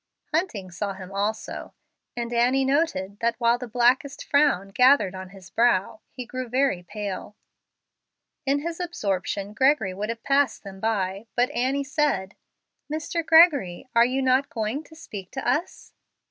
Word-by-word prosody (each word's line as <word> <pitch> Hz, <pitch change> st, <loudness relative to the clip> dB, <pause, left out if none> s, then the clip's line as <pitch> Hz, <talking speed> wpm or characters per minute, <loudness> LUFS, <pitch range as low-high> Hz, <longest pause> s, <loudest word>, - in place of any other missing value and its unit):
Hunting 235 Hz, -, -1 dB
saw 200 Hz, +3 st, -3 dB
him 190 Hz, 0 st, -10 dB
also, 205 Hz, +3 st, -3 dB, 0.4 s
and 235 Hz, 0 st, -3 dB
Annie 250 Hz, +3 st, +3 dB
noted 240 Hz, -, 0 dB
that, 235 Hz, 0 st, +1 dB
while 235 Hz, 0 st, +2 dB
the 250 Hz, -, -6 dB
blackest 250 Hz, +4 st, +1 dB
frown 280 Hz, -10 st, +2 dB
gathered 250 Hz, -3 st, +4 dB
on 185 Hz, 0 st, -8 dB
his 190 Hz, -2 st, -14 dB
brow, 220 Hz, -3 st, +2 dB
he 250 Hz, -1 st, -8 dB
grew 255 Hz, 0 st, -5 dB
very 260 Hz, -6 st, +1 dB
pale. 205 Hz, +2 st, -6 dB, 1.1 s
In 280 Hz, +1 st, +1 dB
his 335 Hz, +2 st, -4 dB
absorption, 200 Hz, -, -2 dB
Gregory 260 Hz, -5 st, +2 dB
would 205 Hz, +3 st, -4 dB
have 230 Hz, 0 st, -5 dB
passed 275 Hz, -3 st, +1 dB
by 200 Hz, -, -7 dB
them, 195 Hz, 0 st, -2 dB
but 245 Hz, +3 st, +2 dB
Annie 265 Hz, +2 st, 0 dB
said, 275 Hz, -10 st, 0 dB, 0.6 s
"Mr. 315 Hz, +2 st, -2 dB
Gregory, 305 Hz, -, +5 dB
are 235 Hz, -, +6 dB
you 260 Hz, +2 st, 0 dB
not 260 Hz, +2 st, +2 dB
going 225 Hz, +6 st, -3 dB
to 320 Hz, -, -16 dB
speak 200 Hz, -11 st, -9 dB
to 265 Hz, -, -4 dB
us?" 335 Hz, +5 st, -2 dB
240 Hz, 155 wpm, -25 LUFS, 200-280 Hz, 1.1 s, are